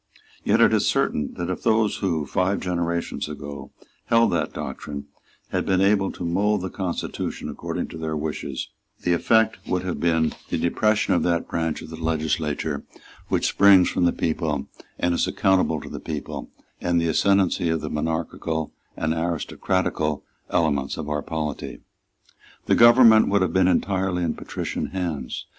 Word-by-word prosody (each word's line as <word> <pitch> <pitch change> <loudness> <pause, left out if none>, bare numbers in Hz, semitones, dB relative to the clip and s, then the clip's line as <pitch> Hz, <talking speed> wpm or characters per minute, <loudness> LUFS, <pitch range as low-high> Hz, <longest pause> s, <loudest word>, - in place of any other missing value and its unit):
Yet - - +3
it - - +6
is - - +3
certain 75 -2 0
that 85 +1 -3
if 90 - -4
those 110 -1 +2
who, 85 -6 -1
five 95 +7 0
generations 85 -3 -2
ago, 70 -2 -7 0.4
held 115 0 +4
that - - 0
doctrine, 70 +1 -6 0.4
had - - -1
been 95 -1 +1
able 100 0 +3
to 90 - -6
mould 100 +4 +1
the 95 - -4
constitution 95 -3 -4
according - - -4
to 80 - -8
their 80 -1 -2
wishes, 75 -3 -4 0.3
the 90 - +2
effect 110 +5 +3
would 90 0 0
have 90 -1 -3
been 80 -2 +2 0.2
the - - 0
depression 105 +6 +2
of 85 - +2
that 85 0 0
branch 80 -2 -2
of - - -10
the 80 0 -8
legislature 80 -2 -1 0.4
which - - 0
springs 100 -2 +6
from 90 - +1
the 85 - +4
people 80 -3 -2 0.3
and 85 0 +1
is - - +1
accountable 90 -5 +2
to - - -9
the - - -6
people, 75 -2 -6 0.3
and 85 -1 +2
the 85 - 0
ascendency 95 +1 +2
of 80 -1 0
the 75 - -4
monarchical 80 0 -2 0.2
and 80 0 0
aristocratical 80 -1 -1 0.3
elements 70 -4 0
of 75 -2 -5
our 75 -1 -1
polity. 75 -2 -4 0.9
The - - +2
government 120 -2 +7
would 100 -1 +3
have - - -1
been 95 -1 +4
entirely 95 0 +1
in 85 - 0
patrician - - -4
hands. 80 -9 -4
85 Hz, 165 wpm, -24 LUFS, 80-95 Hz, 0.9 s, government